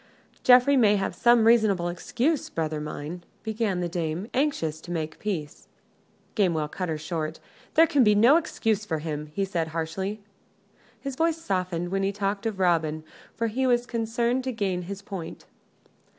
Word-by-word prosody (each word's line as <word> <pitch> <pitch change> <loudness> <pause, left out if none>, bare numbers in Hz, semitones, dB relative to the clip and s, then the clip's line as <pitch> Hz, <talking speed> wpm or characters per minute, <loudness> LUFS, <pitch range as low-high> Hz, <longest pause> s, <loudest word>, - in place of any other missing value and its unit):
"Geoffrey 255 +3 +6
may 215 -5 +5
have 195 -1 -1
some 240 -2 +4
reasonable 215 -6 +4
excuse, 250 - -1
brother 155 -2 -2
mine," 150 +3 -6 0.2
began 215 -4 -1
the 175 - -1
dame, 170 +2 -3
anxious 205 - 0
to - - -12
make 160 -2 -4
peace. 170 -8 -4 0.7
Gamewell 170 -7 +1
cut 180 +2 -4
her 160 - -1
short. 155 0 -4 0.4
"There 325 - +7
can 290 -4 +3
be 210 -2 +5
no 240 +9 +6
excuse 225 - -1
for 165 -7 -2
him," 150 -1 -4
he 195 +6 -2
said, 170 -4 -2
harshly. 165 +6 -3 0.8
His 275 +1 -5
voice 330 +2 +1
softened 185 - -2
when 195 +1 -1
he 195 0 +1
talked 200 +1 -2
of 210 -3 -4
Robin, 160 -4 +1 0.3
for 230 - -1
he 255 +4 0
was 240 -1 +2
concerned 235 +2 -1
to 260 - -1
gain 195 -6 -1
his 200 0 -6
point. 190 -5 -7
195 Hz, 165 wpm, -26 LUFS, 165-235 Hz, 0.8 s, There